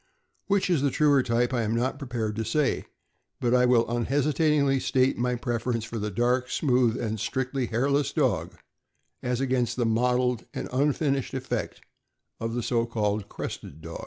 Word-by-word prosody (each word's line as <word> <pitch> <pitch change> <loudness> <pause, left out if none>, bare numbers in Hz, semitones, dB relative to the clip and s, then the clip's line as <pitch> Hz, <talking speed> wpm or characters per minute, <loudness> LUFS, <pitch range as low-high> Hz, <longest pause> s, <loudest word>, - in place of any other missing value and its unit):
Which 200 -1 +2
is 175 -6 +2
the 140 - +2
truer 145 0 +4
type 120 0 0
I 120 - +1
am 110 0 0
not 130 +4 -1
prepared 120 -6 -3
to 115 - -1
say, 150 +4 0 0.5
but 120 -1 +1
I 125 0 +5
will 120 -2 +4
unhesitat 140 +6 +1
ingly 140 -3 +2
state 130 0 +2
my 125 0 0
preference 120 -2 -2
for 115 -1 -5
the 105 +1 -2
dark, 125 +4 +1
smooth, 125 -5 +2
and 110 -1 -2
strictly 130 +3 -2
hairless 140 +4 +1
dog 110 - 0 0.7
as 125 0 -1
against 125 -3 0
the 120 - 0
mottled 125 +1 +1
and - - -3
unfinished 140 -1 0
effect 130 0 -3 0.6
of 115 +1 -3
the 120 - -2
so 115 -1 0
called 105 -2 -1
crested 75 - -7
dog. 85 0 -7
125 Hz, 170 wpm, -27 LUFS, 115-135 Hz, 0.7 s, I